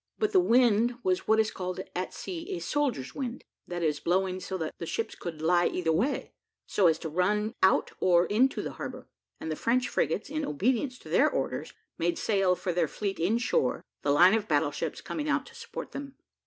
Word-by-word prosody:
But 425 -1 +1
the 380 - +5
wind 240 - +4
was 185 -1 0
what 220 0 +4
is 220 0 +2
called 185 0 -4 0.2
at 180 +1 -2
sea 365 +1 -5
a - - -4
soldier's 265 - -1
wind, 255 -3 -5 0.2
that 175 -1 -3
is, 150 -2 +1
blowing 185 +1 0
so 190 +1 -4
that 160 -3 -3
the 170 - -5
ships - - -2
could 160 -3 -7
lie 175 +1 +4
either 170 -3 0
way, 230 - 0 0.3
so 190 - +3
as 160 -1 +3
to 165 - -5
run 210 +7 +1
out 190 - +4
or 175 -1 +4
into 250 +6 +2
the - - -4
harbour, - - -7 0.3
and 160 - -4
the - - -1
French 245 +8 +1
frigates, 165 +8 0
in 310 +2 -3
obedience 250 - 0
to - - -13
their - - +4
orders, - - -3 0.3
made 170 0 +1
sail 195 -4 +2
for 180 0 -3
their 170 -2 +2
fleet 195 +4 -3
in 190 +8 +2
shore, 135 - 0 0.2
the 145 - -1
line 175 +7 +7
of 220 -1 +1
battle 145 -1 +2
ships - - -4
coming 300 -1 -4
out - - +1
to 470 - -14
support 470 - -7
them. 280 -1 -7
190 Hz, 210 wpm, -29 LUFS, 170-245 Hz, 0.3 s, line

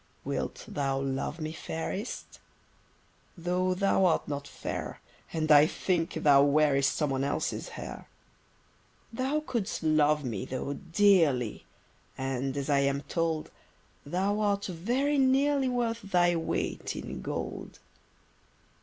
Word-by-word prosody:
Wilt - - -3
thou 135 -2 -1
love 135 +4 -3
me, 155 0 -4
fairest? 165 +7 -5 1.0
Though 180 +2 0
thou 195 0 +3
art 175 - +2
not 145 -1 -4
fair; - - -5 0.3
And 155 -1 0
I 150 +1 +8
think 175 -1 -1
thou 145 -3 +5
wearest 140 -1 +3
Someone 135 -3 0
else's 140 - -2
hair. - - -8 1.0
Thou 265 +6 0
could'st 220 - -2
love, 150 -1 +3 0.3
though, 130 +2 -3
dearly: 165 - +2 0.5
And, 135 +1 -2
as 140 -1 -2
I 140 -2 +3
am 140 0 +1
told, 160 +1 -2 0.5
Thou 190 +7 0
art 205 -1 +1
very 245 - 0
nearly 270 +1 +3
Worth 235 -2 -1
thy 175 -3 +2
weight, 165 -1 -2
in - - -6
gold. - - -5
165 Hz, 120 wpm, -29 LUFS, 140-200 Hz, 1.0 s, I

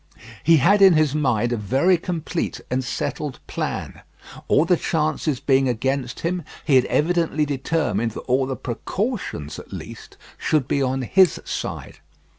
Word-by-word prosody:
He 165 +2 +6
had 200 +9 +4
in 190 -2 +8
his 155 -3 +2
mind 120 -6 +1
a - - -1
very 135 - +2
complete 170 -1 -3
and 130 +1 0
settled 135 +1 -3
plan. - - -4 0.5
All 150 - +4
the 180 - +4
chances 155 -4 -1
being 135 -1 +2
against 130 +2 -2
him, 175 +1 -1 0.2
he 145 - +3
had 130 - +5
evidently 165 -2 +1
determined 135 -6 -1
that - - -6
all 130 +1 +1
the 135 - -3
precautions 125 - -4
at - - -13
least - - -9 0.2
should 150 -5 +1
be 140 - 0
on 130 0 0
his 185 +8 +4
side. - - -5
145 Hz, 155 wpm, -22 LUFS, 130-165 Hz, 0.5 s, in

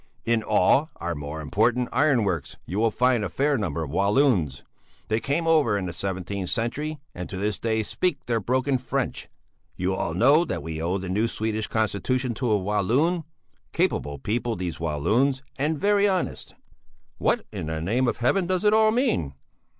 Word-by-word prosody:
In 115 -1 +2
all 110 - +3
our 85 0 -3
more 75 +1 -6
important 110 +10 +1
iron 130 -2 +3
works 90 -7 -2
you 95 +6 -3
will 115 +1 +3
find 125 0 +2
a 100 - -2
fair 140 - +1
number 85 - -2
of 70 - -6
Walloons; 100 - +2 0.5
they 110 +1 +2
came 145 +7 -1
over 150 -10 +3
in 95 - -3
the 90 - -4
seventeenth 95 +1 -3
century 150 +7 -2 0.2
and 90 0 -6
to 95 - -5
this 105 +1 -1
day 110 -1 0
speak 155 - -2
their 115 -1 0
broken 130 +4 0
French. 130 +1 -3 0.5
You 90 +1 -1
all 85 -3 -2
know 140 - +5
that - - -4
we 80 -1 -5
owe 90 +4 0
the 95 -1 -5
new 105 +5 +1
Swedish 110 -1 -2
constitution 115 +4 0
to 120 +1 -2
a 105 - +4
Walloon. 115 - +1 0.5
Capable 70 0 0
people, 115 - -2
these 90 -3 -4
Walloons, 110 - +1 0.2
and 150 +3 0
very 205 +4 +3
honest!" 190 -2 -2 0.6
"What - - +1
in - - -5
the 80 0 -2
name 115 +10 +1
of - - 0
heaven 175 +10 +1
does 185 +2 0
it 210 - +5
all 220 0 +5
mean?" 215 - 0
110 Hz, 180 wpm, -25 LUFS, 95-135 Hz, 0.6 s, know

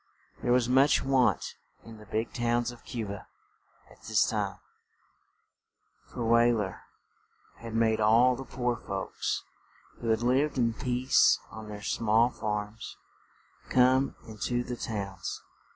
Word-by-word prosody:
There 120 - 0
was 125 -1 +3
much 135 +3 +4
want 135 -2 +1 0.3
in 115 -1 -12
the 105 - -14
big 110 +2 -2
towns 120 0 0
of 120 - -15
Cu 115 -3 -4
ba 100 0 -7 0.6
at - - -19
this - - +2
time, - - -2 1.5
for 120 - -5
Wey 115 +1 +5
ler 105 -5 -2 0.8
had 115 -1 -8
made 110 -1 +2
all 115 +4 +5
the 135 - -7
poor 125 -2 -2
folks, - - -4 0.6
who 115 - -5
had 110 +1 +1
lived 135 +4 +2
in 115 -2 +2
peace 125 +2 +3
on 110 -1 -9
their 105 -1 -8
small 115 +3 +2
farms, 105 0 -5 0.7
come 130 +2 +3
in 110 -1 -10
to 120 0 0
the 125 - -5
towns. 100 -5 -5
115 Hz, 140 wpm, -29 LUFS, 110-125 Hz, 1.5 s, Wey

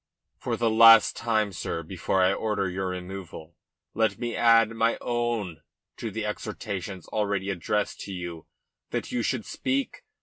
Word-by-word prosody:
"For - - -2
the 115 -1 +1
last 115 +1 +8
time, 110 -3 0
sir, 85 -1 -4
before 95 +2 0
I 95 +1 +4
order 105 -2 -1
your 95 +1 -3
removal, 90 -3 -7 0.4
let 110 -2 +1
me 120 -1 -3
add 115 -1 +5
my 115 0 +1
own 120 -9 -2 0.4
to - - -4
the 110 -1 -4
exhortations 100 -4 -5
already 100 -2 -1
addressed 100 +3 -2
to 100 - -7
you, 85 -3 -6 0.4
that - - -3
you 120 - 0
should 115 -1 -1
speak. 275 - -2
105 Hz, 155 wpm, -26 LUFS, 95-115 Hz, 0.4 s, last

